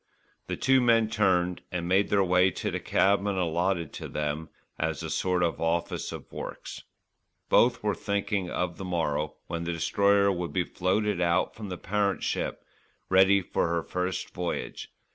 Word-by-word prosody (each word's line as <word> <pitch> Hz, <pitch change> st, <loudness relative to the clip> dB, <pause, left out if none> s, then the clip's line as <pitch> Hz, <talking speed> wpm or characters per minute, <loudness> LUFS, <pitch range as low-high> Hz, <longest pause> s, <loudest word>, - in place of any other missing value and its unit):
The -, -, -3 dB
two 135 Hz, -1 st, +4 dB
men 115 Hz, -2 st, +4 dB
turned 90 Hz, -5 st, +2 dB
and 85 Hz, -1 st, -3 dB
made 95 Hz, +3 st, +3 dB
their 100 Hz, -1 st, +3 dB
way 90 Hz, 0 st, +4 dB
to -, -, -3 dB
the -, -, -2 dB
cabin 100 Hz, +1 st, +2 dB
allotted 85 Hz, -1 st, 0 dB
to -, -, -6 dB
them 75 Hz, +1 st, -3 dB, 0.3 s
as 80 Hz, -2 st, -1 dB
a -, -, -4 dB
sort 90 Hz, -1 st, +1 dB
of 85 Hz, -2 st, -1 dB
office 85 Hz, +1 st, -1 dB
of -, -, -9 dB
works. -, -, -7 dB, 0.7 s
Both 120 Hz, -1 st, +4 dB
were 105 Hz, -1 st, +1 dB
thinking 100 Hz, -1 st, -2 dB
of 90 Hz, -1 st, -2 dB
the -, -, -6 dB
morrow 80 Hz, -5 st, -1 dB
when 85 Hz, 0 st, -4 dB
the 85 Hz, 0 st, -2 dB
Destroyer 100 Hz, +4 st, +3 dB
would 90 Hz, -2 st, -3 dB
be 90 Hz, -, +2 dB
floated 95 Hz, +2 st, 0 dB
out 85 Hz, +1 st, +2 dB
from 110 Hz, -2 st, -8 dB
the 90 Hz, -, -4 dB
parent 100 Hz, +1 st, -1 dB
ship -, -, -2 dB, 0.4 s
ready 95 Hz, +1 st, +5 dB
for 85 Hz, -, 0 dB
her 85 Hz, -1 st, -1 dB
first 90 Hz, +1 st, -3 dB
voyage. 90 Hz, -1 st, -4 dB
90 Hz, 170 wpm, -28 LUFS, 85-100 Hz, 0.7 s, ready